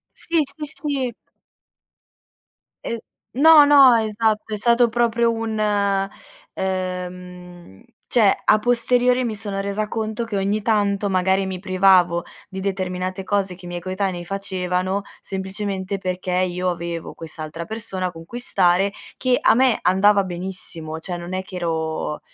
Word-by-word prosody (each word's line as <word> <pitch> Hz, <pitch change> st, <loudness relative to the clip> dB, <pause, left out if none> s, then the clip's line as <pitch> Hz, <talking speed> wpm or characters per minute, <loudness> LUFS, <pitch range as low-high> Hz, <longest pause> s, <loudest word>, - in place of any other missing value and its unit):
Sì, 335 Hz, 0 st, -1 dB
sì, 300 Hz, +2 st, -5 dB
sì. 275 Hz, -5 st, -2 dB, 1.7 s
Ehm, 235 Hz, -, -2 dB, 0.4 s
no, 315 Hz, -1 st, +9 dB
no, 280 Hz, -4 st, +7 dB
esatto, 220 Hz, 0 st, 0 dB
è -, -, 0 dB
stato 235 Hz, +1 st, +3 dB
proprio 235 Hz, 0 st, +2 dB
un 225 Hz, -1 st, -3 dB, 0.9 s
ehm, 180 Hz, -, -5 dB, 0.2 s
cioè, 215 Hz, -5 st, +4 dB
a 215 Hz, -, +5 dB
posteriori, 245 Hz, +2 st, +2 dB
mi 225 Hz, -, -2 dB
sono 200 Hz, -2 st, -4 dB
resa 200 Hz, +2 st, -2 dB
conto 220 Hz, +1 st, -3 dB
che, 225 Hz, -3 st, -4 dB
ogni 200 Hz, +2 st, 0 dB
tanto, 205 Hz, -2 st, +1 dB
magari, 190 Hz, +1 st, +1 dB
mi 185 Hz, -1 st, -4 dB
privavo 185 Hz, -3 st, +3 dB, 0.3 s
di 190 Hz, -1 st, -6 dB
determinate 185 Hz, -1 st, -3 dB
cose 195 Hz, -3 st, 0 dB
che 180 Hz, -, -15 dB
i -, -, -7 dB
miei 175 Hz, 0 st, -5 dB
coetanei 185 Hz, -1 st, -3 dB
facevano, 185 Hz, -1 st, -2 dB, 0.2 s
semplicemente 190 Hz, 0 st, -4 dB
perché 185 Hz, -1 st, -4 dB
io 180 Hz, 0 st, 0 dB
avevo 170 Hz, -1 st, -4 dB
quest'altra 160 Hz, 0 st, -7 dB
persona 190 Hz, -3 st, -4 dB
con 165 Hz, -1 st, -11 dB
cui 240 Hz, +7 st, -7 dB
stare, 195 Hz, -4 st, +2 dB, 0.2 s
che 255 Hz, -1 st, +1 dB
a -, -, +5 dB
me 255 Hz, -1 st, +3 dB
andava 195 Hz, +3 st, +4 dB
benissimo, 175 Hz, -3 st, -5 dB
cioè, 175 Hz, +1 st, -5 dB
non 175 Hz, +1 st, -7 dB
è 185 Hz, 0 st, -2 dB
che 185 Hz, 0 st, -10 dB
ero 160 Hz, -3 st, -2 dB
190 Hz, 140 wpm, -22 LUFS, 180-220 Hz, 1.7 s, no